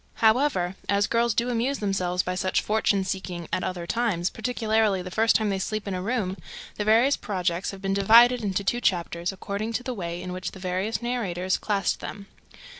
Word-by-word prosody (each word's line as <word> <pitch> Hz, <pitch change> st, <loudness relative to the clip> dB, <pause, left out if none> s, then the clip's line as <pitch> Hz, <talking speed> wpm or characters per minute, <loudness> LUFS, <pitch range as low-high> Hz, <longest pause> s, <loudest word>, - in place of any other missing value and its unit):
However, 220 Hz, -6 st, +2 dB
as 200 Hz, +1 st, +3 dB
girls 235 Hz, -1 st, +1 dB
do 240 Hz, +1 st, +1 dB
amuse 245 Hz, +4 st, 0 dB
themselves 185 Hz, -3 st, 0 dB
by 180 Hz, -, -2 dB
such 185 Hz, +1 st, 0 dB
fortune 210 Hz, -2 st, +1 dB
seeking 185 Hz, -3 st, -4 dB
at 185 Hz, -, 0 dB
other 180 Hz, -2 st, -3 dB
times, 195 Hz, -5 st, 0 dB
particularly 220 Hz, -4 st, 0 dB
the 180 Hz, -, -7 dB
first 225 Hz, +3 st, +3 dB
time 215 Hz, -1 st, +2 dB
they 195 Hz, -, -1 dB
sleep 215 Hz, +1 st, -3 dB
in 200 Hz, -, -2 dB
a 185 Hz, -, -3 dB
room, 200 Hz, -3 st, -1 dB, 0.4 s
the 210 Hz, -, -1 dB
various 230 Hz, +6 st, +4 dB
projects 180 Hz, -2 st, -2 dB
have 195 Hz, -1 st, -9 dB
been 195 Hz, 0 st, 0 dB
divided 235 Hz, +5 st, +6 dB
into 200 Hz, -1 st, -1 dB
two 240 Hz, +5 st, 0 dB
chapters, 175 Hz, -2 st, 0 dB
according 200 Hz, +4 st, -4 dB
to 245 Hz, -, -2 dB
the 255 Hz, -, -3 dB
way 175 Hz, -5 st, -4 dB
in 180 Hz, 0 st, -6 dB
which 185 Hz, 0 st, -5 dB
the 190 Hz, -, -10 dB
various 185 Hz, +5 st, -2 dB
narrators 190 Hz, -7 st, -1 dB
classed 200 Hz, -4 st, 0 dB
them. 200 Hz, 0 st, -7 dB
200 Hz, 195 wpm, -26 LUFS, 185-225 Hz, 0.4 s, divided